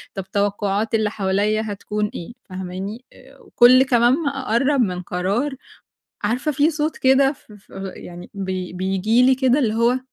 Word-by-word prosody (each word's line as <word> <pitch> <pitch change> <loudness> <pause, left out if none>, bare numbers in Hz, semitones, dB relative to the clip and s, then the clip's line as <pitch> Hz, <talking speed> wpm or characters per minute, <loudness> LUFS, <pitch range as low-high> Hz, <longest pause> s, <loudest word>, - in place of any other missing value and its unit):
طَب، 190 0 -7
توقعات 205 +2 0
اللي 215 -1 +1
حواليَّ 205 +2 0
هتكون 210 0 -3
إيه؟ 175 - -7 0.2
فاهماني؟ 190 +5 -6 0.3
وكُل 250 +2 +5
كمان 240 -2 +3
ما 295 0 0
أقرَّب 270 0 0
من 180 -5 -1
قرار، 200 +11 -2 0.7
عارفة 245 +8 0
في 295 +3 +2
صوت 305 0 -2
كده، 270 +1 +4
ف 265 - -22
ف 205 - -19 0.3
يعني 175 0 -10
ب 200 -1 -5 0.3
بييجي 195 +6 +1
لي 260 0 +5
كده، 260 +1 +2
اللي 225 -5 +1
هو: 235 +3 +2
220 Hz, 155 wpm, -21 LUFS, 195-260 Hz, 0.7 s, وكُل